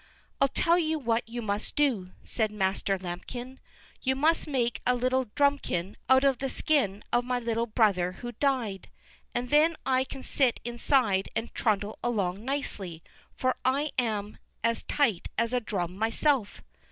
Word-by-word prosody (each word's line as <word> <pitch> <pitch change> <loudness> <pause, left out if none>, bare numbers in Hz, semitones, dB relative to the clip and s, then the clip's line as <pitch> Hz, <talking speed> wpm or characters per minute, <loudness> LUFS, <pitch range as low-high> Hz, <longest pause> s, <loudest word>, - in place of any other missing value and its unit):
"I'll 275 - +6
tell 335 +5 +2
you 320 -1 +1
what 230 -4 -1
you 240 0 -4
must 205 0 -2
do," 230 -11 +1
said 220 -2 -1
Master 195 -1 0
Lambikin; 240 +9 -7 0.4
"you 265 0 +1
must 315 +5 +2
make 245 -5 0
a 250 - +3
little 255 +1 +1
drumikin 280 -11 +1
out 260 +1 +6
of 270 -3 +3
the 270 - -2
skin 255 -10 +1
of 240 - +3
my 250 0 -1
little 235 -1 -1
brother 200 -6 +2
who 240 +5 -7
died, 240 -6 -1 0.5
and 245 0 -2
then 310 +3 +5
I 260 -1 +3
can 270 0 -8
sit 260 -4 +2
inside 235 -5 +2
and 225 +1 -3
trundle 210 -2 0
along 200 -4 -1
nicely, 200 - -3 0.3
for 255 0 +1
I'm 250 -7 0 0.2
as 230 0 +1
tight 230 - +1
as 230 +1 +1
a 250 - +3
drum 180 -5 -3
myself." 225 +1 +1
240 Hz, 155 wpm, -28 LUFS, 205-265 Hz, 0.5 s, I'll